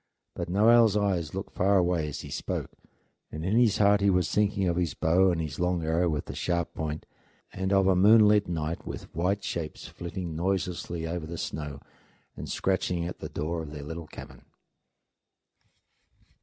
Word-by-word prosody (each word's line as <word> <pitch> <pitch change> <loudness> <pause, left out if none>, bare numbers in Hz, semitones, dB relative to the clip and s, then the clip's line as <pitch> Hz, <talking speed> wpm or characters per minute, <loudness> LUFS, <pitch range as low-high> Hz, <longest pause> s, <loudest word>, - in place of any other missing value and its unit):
But - - -5
Noel's 110 +2 +5
eyes 90 -6 0
looked 95 - -5
far 100 0 +3
away 85 -3 +1
as 75 - -6
he - - -9
spoke, - - -4 0.6
and 80 +2 -5
in 100 +4 +1
his 115 -3 +4
heart 100 -1 +4
he 100 - +4
was 90 -1 +2
thinking 100 -2 +1
of 85 - +1
his 85 -3 -1
bow 90 +4 +3
and 85 -2 0
his 75 -3 -4
long 90 -1 0
arrow 80 +2 +1
with 75 -2 -2
the - - -7
sharp 85 -1 -2
point, 80 -1 -4 0.5
and 95 +1 -2
of 95 -1 +4
a 95 -1 +4
moonlit 105 +1 +6
night 80 -1 -3
with - - -7
white 95 +4 0
shapes 80 -3 -5
flitting 85 -1 -6
noiselessly 85 -1 -2
over 80 -1 -4
the 85 +1 -6
snow 75 -3 -5 0.5
and - - -7
scratching 90 -2 0
at 90 - -6
the - - -6
door 80 +2 -3
of 80 - -7
the 75 -1 -8
little 80 +2 -7
cabin. - - -12
90 Hz, 180 wpm, -28 LUFS, 80-95 Hz, 0.6 s, moonlit